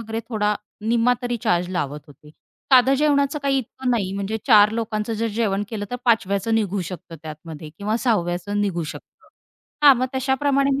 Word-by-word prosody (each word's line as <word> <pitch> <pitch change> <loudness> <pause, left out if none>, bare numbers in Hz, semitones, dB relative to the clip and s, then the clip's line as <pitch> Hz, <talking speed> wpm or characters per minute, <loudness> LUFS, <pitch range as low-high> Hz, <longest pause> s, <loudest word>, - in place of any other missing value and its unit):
वगैरे 225 0 -4
थोडा 210 -2 0 0.3
निम्मा 230 +3 +2
तरी 245 -1 -1
चार्ज 175 0 +1
लावत 150 -5 -3
होते. 150 +1 -17 0.4
साधं 260 +1 +6
जेवणाचं 280 0 +2
काही 275 -1 +2
इतकं 255 +1 -4
नाही 200 -5 0
म्हणजे 200 +2 -2
4 210 -3 +7
लोकांचं 225 -1 -2
जर 230 +2 -1
जेवण 205 -3 0
केलं 210 -3 -4
तर 245 - -2
5व्याचं 225 -1 +1
निघू 205 -3 0
शकतं 175 -2 -9
त्यातमध्ये 155 0 -9
किंवा 210 +2 -1
6व्याचं 205 -3 -1
निघू 180 -5 -1
शकतं. 155 - -10 0.5
हां. 280 -2 +9
मग 255 +1 0
तशाप्रमाणे 275 +1 +1
मी 275 - -1
220 Hz, 170 wpm, -22 LUFS, 190-250 Hz, 0.5 s, हां